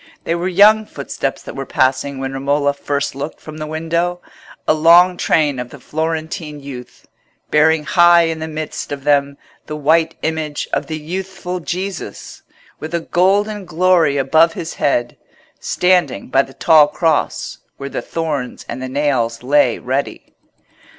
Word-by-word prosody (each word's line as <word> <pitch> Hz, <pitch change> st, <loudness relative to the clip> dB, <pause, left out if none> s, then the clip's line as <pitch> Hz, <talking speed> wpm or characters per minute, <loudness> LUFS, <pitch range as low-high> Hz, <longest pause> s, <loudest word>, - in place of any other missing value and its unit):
They 165 Hz, -, -1 dB
were 170 Hz, +2 st, -2 dB
young 210 Hz, +4 st, +5 dB
footsteps 140 Hz, -1 st, -4 dB
that -, -, -9 dB
were 135 Hz, 0 st, -5 dB
passing 130 Hz, +1 st, 0 dB
when 135 Hz, 0 st, -4 dB
Romola 140 Hz, +1 st, 0 dB
first 140 Hz, 0 st, -2 dB
looked 140 Hz, +3 st, -6 dB
from 155 Hz, 0 st, -10 dB
the 155 Hz, -, -4 dB
window—a 170 Hz, +1 st, -3 dB
long 170 Hz, +3 st, +6 dB
train 150 Hz, -6 st, +1 dB
of 125 Hz, 0 st, -5 dB
the 140 Hz, -, -12 dB
Florentine 160 Hz, +1 st, -4 dB
youth, 130 Hz, -3 st, -10 dB, 0.4 s
bearing 155 Hz, +1 st, +4 dB
high 175 Hz, +1 st, +5 dB
in 165 Hz, -1 st, -2 dB
the 160 Hz, -, -4 dB
midst 155 Hz, -2 st, -5 dB
of 140 Hz, -1 st, -5 dB
them 140 Hz, -1 st, +1 dB, 0.3 s
the 150 Hz, -, -5 dB
white 160 Hz, +2 st, +2 dB
image 155 Hz, -2 st, -2 dB
of -, -, -1 dB
the 155 Hz, -, -4 dB
youthful 180 Hz, +3 st, -5 dB
Jesus, 180 Hz, -, -6 dB, 0.4 s
with 160 Hz, +2 st, -5 dB
a 170 Hz, -, -1 dB
golden 200 Hz, +5 st, +1 dB
glory 175 Hz, -4 st, +2 dB
above 160 Hz, +5 st, +3 dB
his 165 Hz, 0 st, -6 dB
head, 120 Hz, -4 st, 0 dB, 0.4 s
standing 180 Hz, -, +1 dB
by 135 Hz, -, +4 dB
the 135 Hz, -1 st, -10 dB
tall 155 Hz, -3 st, +5 dB
cross 160 Hz, 0 st, -1 dB, 0.2 s
where 140 Hz, -, -6 dB
the -, -, -4 dB
thorns 150 Hz, -6 st, -4 dB
and 130 Hz, -, -6 dB
the 130 Hz, -, -4 dB
nails 130 Hz, -5 st, -1 dB
lay 135 Hz, -2 st, +3 dB
ready. 135 Hz, +3 st, -4 dB
155 Hz, 155 wpm, -18 LUFS, 140-170 Hz, 0.4 s, long